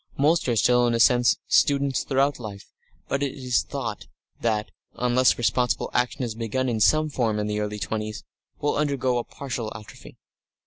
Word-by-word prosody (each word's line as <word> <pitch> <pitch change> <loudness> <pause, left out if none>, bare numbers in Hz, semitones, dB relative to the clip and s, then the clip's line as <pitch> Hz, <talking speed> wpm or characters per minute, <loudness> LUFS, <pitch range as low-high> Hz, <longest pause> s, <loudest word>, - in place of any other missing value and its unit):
Most 150 0 +2
are 120 - +1
still, 120 +2 +4
in 120 - +1
a - - 0
sense, 120 +1 +4
students 140 -1 +2
throughout 140 0 +1
life, 105 -4 -9 0.4
but 140 - -1
it 140 -2 -1
is 125 -3 0
thought 115 -7 -5 0.3
that, 110 -2 -1 0.2
unless 125 +1 +3
responsible 120 -1 0
action 125 +1 0
is 115 -3 -3
begun 115 +3 -2
in 115 -2 -1
some 155 +8 +4
form 120 -7 -1
in 105 - -1
the 105 0 -2
early 105 0 -3
twenties, 110 +1 -4 0.4
will 145 - 0
undergoes 135 -4 0
a - - -3
partial 120 -5 -5
atrophy. 105 +1 -12
125 Hz, 175 wpm, -25 LUFS, 110-135 Hz, 0.4 s, still